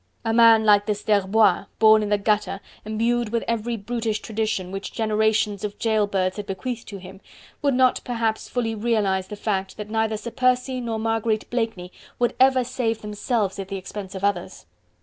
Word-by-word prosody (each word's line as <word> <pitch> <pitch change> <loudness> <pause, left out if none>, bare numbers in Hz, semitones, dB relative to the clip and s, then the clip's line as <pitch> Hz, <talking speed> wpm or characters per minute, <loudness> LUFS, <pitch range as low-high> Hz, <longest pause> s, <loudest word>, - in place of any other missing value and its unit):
A 225 - +1
man 225 -1 +6
like 205 0 +5
this 210 -1 -2
d'Herbois 210 +1 +3
born 220 -1 +6
in 210 - -2
the 205 - +3
gutter, 210 -1 0 0.3
imbued 230 +2 0
with 230 +1 -1
every 230 0 -1
brutish 220 0 -2
tradition, 215 -4 -2
which 195 0 -5
generations 215 -2 +1
of 205 -1 -4
jail 220 -2 +1
birds 185 -1 -1
had 205 - -6
bequeathed 230 +5 -5
to 200 - -7
him, 190 +1 -12 0.4
would 280 -3 +2
not 255 0 +3
perhaps 230 -2 -2
fully 230 -3 -1
realize 205 -4 0
the 210 - -7
fact 195 -2 -3
that 210 0 -7
neither 220 -1 0
Sir 235 +3 -7
Percy 255 +1 +1
nor 230 -2 -3
Marguerite 225 -1 -1
Blakeney 225 -7 -2 0.3
would 240 -1 +1
ever 260 -1 +5
save 235 -3 -2
themselves 210 -1 -2
at 195 - -5
the 195 0 -4
expense 195 +1 -7
of 190 - -6
others. 200 -3 -2
220 Hz, 185 wpm, -23 LUFS, 205-230 Hz, 0.4 s, man